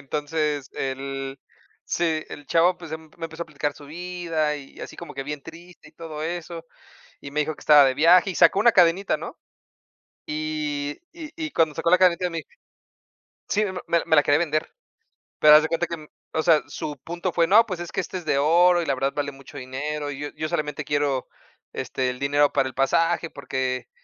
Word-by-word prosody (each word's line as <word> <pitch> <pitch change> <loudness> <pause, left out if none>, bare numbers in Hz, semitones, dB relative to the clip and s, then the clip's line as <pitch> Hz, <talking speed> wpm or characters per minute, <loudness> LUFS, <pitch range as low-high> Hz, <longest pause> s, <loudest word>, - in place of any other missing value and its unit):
Entonces, 150 0 -2
el, 135 0 -4 0.5
sí, 160 -2 0
el 145 - -10
chavo, 175 +4 +3
pues, 165 -3 -10
emp 160 -1 -9
me 165 - -6
empezó 160 +1 -7
a - - -6
explicar 145 -2 -3
su 145 - -14
vida 165 -1 -2
y 135 -2 -13
así - - -8
como 170 -3 -9
que 135 -1 -5
bien 145 0 -5
triste 170 0 -13
y 155 - -22
todo 155 -2 -7
eso, 170 0 -5 0.6
y 140 - -9
me 150 - -1
dijo 155 +1 -1
que - - -17
estaba 150 -2 +7
de 130 - +2
viaje, 175 +7 +5
y 185 - -4
sacó 165 +5 +5
una 235 +2 +5
cadenita, 180 +2 +4
¿no? - - -8 0.9
Y 150 -1 -3
y 320 -3 -9
y 315 -2 -4
cuando 160 - +1
sacó 165 +2 0
la 180 - +6
cadenita, 180 -1 +3
me 165 -1 -4 1.1
Sí, 210 +1 +1
me 195 - -3
me 170 - +2
la - - -4
me 160 - +3
la 150 - +7
quería 145 0 +3
vender, 155 -2 -1 0.7
pero 150 0 +8
haz 155 - +5
de 160 - -1
cuenta 165 +1 0
que, 160 -2 -7 0.3
o 160 - 0
sea, 160 -2 +4
su 150 -1 -5
punto 175 +2 -3
fue, 170 0 +3
no, 210 +6 +6
pues, 185 -5 -5
es 175 - -6
que - - -1
esta 185 - -5
es 180 - -6
de 140 - +1
oro, 175 +4 +4
y - - -4
la 140 - +1
verdad 135 +1 -1
vale 145 -1 -2
mucho 135 -1 -14
dinero, 145 +3 -4
y 140 - -7
yo 145 - -3
yo 155 - -3
solamente 150 -3 -3
quiero, 145 -3 -1 0.4
este, 130 -1 -2
el 125 - -7
dinero 145 +1 +2
para 135 -2 +1
el 130 - -11
pasaje, 165 +5 +1
porque, 130 -2 -3
155 Hz, 215 wpm, -24 LUFS, 145-170 Hz, 1.1 s, pero